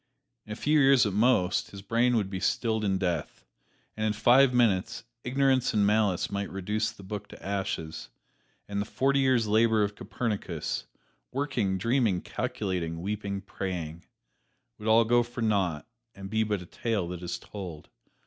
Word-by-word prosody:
In - - -8
a - - -3
few 150 +6 +2
years 135 -3 +6
at 105 - -1
most, 100 -4 +2
his 100 -1 -10
brain 120 +4 +2
would 100 -4 0
be 95 - -3
stilled 110 +3 0
in 95 -2 +1
death; 90 -5 -3 0.5
and 110 - -3
in 110 -1 +1
five 125 +5 +5
minutes, 115 -7 +1 0.2
ignorance 130 -1 +2
and 105 -1 +4
malice 105 -3 +2
might 100 0 -2
reduce 105 +3 -1
the 100 - -12
book 105 +1 -6
to - - -13
ashes, 95 -5 -3 0.6
and 100 0 -2
the - - -3
forty 135 +5 +1
years' 130 -4 +3
labor 110 0 +3
of 100 0 -1
Copernicus 100 -7 -3 0.4
working, 125 -9 -1
dreaming, 115 -2 +1
calculating, 95 -10 -3
weeping, 100 -1 -3
praying 90 -4 -5 0.8
would 105 - -6
all 115 +1 +5
go 120 +2 +4
for 120 0 -6
naught 95 -8 +1 0.3
and 95 0 -8
be 110 0 +2
but 105 -4 -2
a - - -12
tale 110 -2 -2
that 90 -1 -6
is 90 0 -3
told. 90 -7 -9
105 Hz, 170 wpm, -28 LUFS, 95-115 Hz, 0.8 s, years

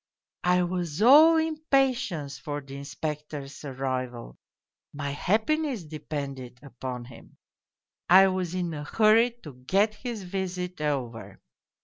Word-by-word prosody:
I 180 0 +4
was 175 -1 -2
all 310 +7 +8
impatience 270 - 0
for 145 -2 -4
the 135 -1 -11
Inspector's 145 0 -6
arrival 130 - -4 0.6
my 145 -1 -4
happiness 225 - 0
depended 140 -5 -6
upon 125 -2 -6
him. 125 - -15 0.7
I 190 +2 +8
was 185 -2 -2
in 175 -2 -2
a 150 -1 -5
hurry 220 +8 +4
to 150 - -9
get 205 +5 +3
his 225 -1 -6
visit 180 -2 -4
over. 120 -9 -3
165 Hz, 115 wpm, -27 LUFS, 140-210 Hz, 0.7 s, all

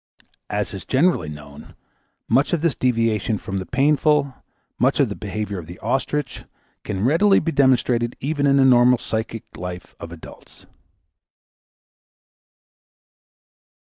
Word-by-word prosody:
As 105 0 -2
is 95 - -7
generally 135 - +1
known, 75 -1 -12 0.5
much 135 +8 +2
of 170 - +1
this 170 -4 +1
deviation 115 -3 0
from 95 0 -5
the 95 - -7
painful, 145 +1 +2 0.5
much - - +2
of - - +3
the - - -5
behavior 105 -2 -4
of 80 - -10
the 90 +2 -10
ostrich, 135 +5 -2 0.4
can 100 - -4
be 95 - -2
readily 170 - +4
demonstrated 130 -6 +1
even 145 +1 -1
in 140 0 +4
the 135 - +5
normal 125 -1 +5
psychic 110 0 -4
life 90 0 -7
of 85 - -8
adults. 85 -2 -14
120 Hz, 130 wpm, -21 LUFS, 100-140 Hz, 0.5 s, the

